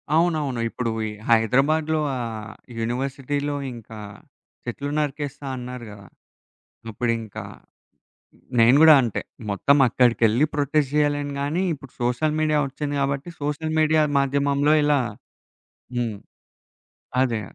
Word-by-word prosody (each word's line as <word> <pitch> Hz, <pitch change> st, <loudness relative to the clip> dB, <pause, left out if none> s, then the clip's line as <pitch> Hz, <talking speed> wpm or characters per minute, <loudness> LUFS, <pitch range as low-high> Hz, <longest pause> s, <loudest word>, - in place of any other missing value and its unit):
అవునవును. 155 Hz, -7 st, +1 dB
ఇప్పుడు 115 Hz, 0 st, -3 dB, 0.2 s
ఈ -, -, -3 dB, 0.2 s
హైదరాబాద్లో 145 Hz, +8 st, +3 dB, 0.2 s
ఆ -, -, -4 dB, 0.6 s
యూనివర్సిటీలో 135 Hz, +4 st, -2 dB, 0.2 s
ఇంకా 110 Hz, -2 st, -10 dB, 0.7 s
చెట్లు 140 Hz, +4 st, -4 dB
నరికేస్తా 145 Hz, -1 st, -3 dB
అన్నారు 125 Hz, -1 st, -7 dB
గదా! 100 Hz, -1 st, -13 dB, 0.8 s
అప్పుడింకా 115 Hz, -1 st, -3 dB, 1.2 s
నేను 115 Hz, +3 st, +6 dB
గూడా 160 Hz, -1 st, +9 dB
అంటే.మొత్తం 115 Hz, +2 st, 0 dB
అక్కడికెళ్ళి 120 Hz, +2 st, +3 dB
ప్రొటెస్ట్ 145 Hz, -1 st, +1 dB
జేయలేను 145 Hz, -1 st, +1 dB
గానీ, 150 Hz, +6 st, -1 dB
ఇప్పుడు 135 Hz, -2 st, -13 dB
సోషల్ 150 Hz, +6 st, 0 dB
మీడియా 155 Hz, -1 st, +2 dB
ఒచ్చింది 145 Hz, +1 st, -4 dB
గాబట్టి, 140 Hz, +4 st, -2 dB
సోషల్ 155 Hz, +2 st, -2 dB
మీడియా 155 Hz, 0 st, +4 dB, 0.2 s
మాధ్యమంలో 140 Hz, +2 st, +2 dB
ఇలా 145 Hz, -1 st, +3 dB, 1.0 s
హ్మ్. 115 Hz, -4 st, -2 dB, 1.1 s
అదే. 115 Hz, -4 st, -1 dB
140 Hz, 105 wpm, -23 LUFS, 120-150 Hz, 1.2 s, గూడా